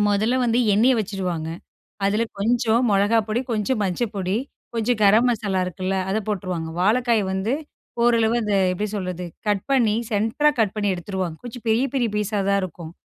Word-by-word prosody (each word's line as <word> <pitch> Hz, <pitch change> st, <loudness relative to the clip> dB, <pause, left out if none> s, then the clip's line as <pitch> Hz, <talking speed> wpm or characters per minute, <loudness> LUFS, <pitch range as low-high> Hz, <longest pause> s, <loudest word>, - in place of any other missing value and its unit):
முதல்ல 215 Hz, +5 st, +2 dB
வந்து 235 Hz, 0 st, +2 dB, 0.2 s
எண்ணெய 245 Hz, +5 st, +4 dB
வச்சுருவாங்க. 185 Hz, -6 st, -3 dB, 0.6 s
அதில 210 Hz, +3 st, +2 dB, 0.2 s
கொஞ்சம் 230 Hz, +2 st, +2 dB
மிளகா 205 Hz, +3 st, +3 dB
பொடி, 220 Hz, +3 st, 0 dB
கொஞ்சம் 215 Hz, +1 st, 0 dB
மஞ்ச 185 Hz, +3 st, -2 dB
பொடி, 190 Hz, +1 st, -1 dB, 0.4 s
கொஞ்சம் 230 Hz, 0 st, 0 dB
கரம் 215 Hz, +5 st, +5 dB
மசாலா 205 Hz, -5 st, 0 dB
இருக்குல்ல, 185 Hz, +1 st, -3 dB, 0.2 s
அத 215 Hz, -, +1 dB
போட்டுருவாங்க. 180 Hz, -5 st, -3 dB
வாழைக்காய 230 Hz, +1 st, +2 dB
வந்து 190 Hz, +5 st, -1 dB, 0.5 s
ஓரளவு 230 Hz, -1 st, +3 dB
அந்த 210 Hz, -1 st, 0 dB, 0.2 s
எப்பிடி 210 Hz, +3 st, -3 dB
சொல்றது, 180 Hz, -2 st, -4 dB, 0.2 s
கட் 200 Hz, -2 st, 0 dB
பண்ணி 230 Hz, -6 st, +3 dB, 0.2 s
சென்டரா 225 Hz, +9 st, +2 dB
கட் 205 Hz, -2 st, 0 dB
பண்ணி 205 Hz, -1 st, +1 dB
எடுத்துருவாங்க. 180 Hz, -2 st, -4 dB
கொஞ்சம் 240 Hz, 0 st, -8 dB
பெரிய 230 Hz, +5 st, +3 dB
பெரிய 240 Hz, -4 st, +1 dB
பீஸா 210 Hz, 0 st, -1 dB
தான் 200 Hz, 0 st, +2 dB
இருக்கும். 170 Hz, -2 st, -7 dB
210 Hz, 160 wpm, -23 LUFS, 190-230 Hz, 0.6 s, கரம்